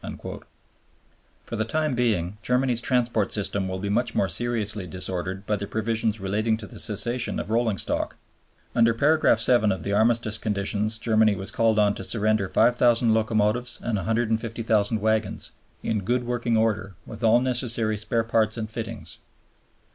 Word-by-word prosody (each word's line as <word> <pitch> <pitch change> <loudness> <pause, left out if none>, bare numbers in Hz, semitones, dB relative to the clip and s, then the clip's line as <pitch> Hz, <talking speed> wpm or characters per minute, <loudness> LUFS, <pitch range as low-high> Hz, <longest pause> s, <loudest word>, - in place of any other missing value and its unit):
" - - -13
For - - -5
the 110 - 0
time 155 +5 -1
being 105 -6 0
Germany's 125 -1 0
transport 120 -4 +1
system 100 -2 -2
will 95 0 -3
be 100 +2 -4
much 115 +4 0
more 95 - +2
seriously 105 0 -1
disordered 95 +2 -4
by 105 0 0
the 100 - -5
provisions 110 0 -1
relating 105 +3 0
to 110 - -9
the - - -10
cession 120 +3 +2
of 110 - -5
rolling 115 -3 +1
stock. - - -2 0.6
Under 115 0 +3
paragraph 150 -1 +3
7 115 -2 +3
of 95 -4 -3
the 100 - -2
Armistice 110 +1 +2
conditions 105 +1 -1
Germany 110 -2 +2
was 95 +1 -4
called 115 -1 +2
on 105 -1 +3
to 95 - -7
surrender 110 -1 0
5000 120 0 +3
locomotives 110 +2 0
and 115 -3 -1
150,000 110 +1 0
wagons, 110 +1 0 0.3
"in 110 - 0
good 120 +5 0
working 120 -1 0
order, 110 -3 0
with 110 +1 -9
all 115 +2 +5
necessary 120 -3 +1
spare 115 +2 -1
parts 110 -1 +1
and 110 -1 -4
fittings." 110 -7 -7
110 Hz, 160 wpm, -25 LUFS, 105-115 Hz, 0.6 s, all